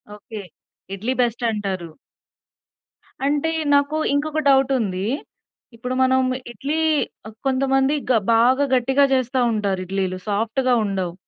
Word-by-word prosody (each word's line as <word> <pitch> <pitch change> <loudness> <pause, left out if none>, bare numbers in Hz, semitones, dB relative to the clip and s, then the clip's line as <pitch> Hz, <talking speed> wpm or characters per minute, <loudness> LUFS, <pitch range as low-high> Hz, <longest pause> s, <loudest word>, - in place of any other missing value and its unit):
Okay. 210 0 -9 0.5
Idli 220 +6 -2
బెస్టంటారు. 210 -7 -2 1.4
అంటే 290 +3 +1 0.2
నాకు 285 +2 +2 0.2
ఇంకొక 305 +2 0
డౌటుంది. 250 -9 +2 0.7
ఇప్పుడు 250 +2 -4
మనం 260 0 +3 0.3
ఇడ్లీ 290 +6 -3 0.5
ఆహ్, 215 - -11
కొంతమంది 270 +1 +2 0.2
గ - - +5 0.2
బాగా 255 +5 +4
గట్టిగా 265 +3 +3
జేస్తా 255 0 0
ఉంటారు 200 -3 -1
ఇడ్లీలు 190 0 -2
సాఫ్ట్‌గా 225 +5 0
ఉండవు. 190 -3 -2
245 Hz, 105 wpm, -22 LUFS, 205-270 Hz, 1.4 s, గ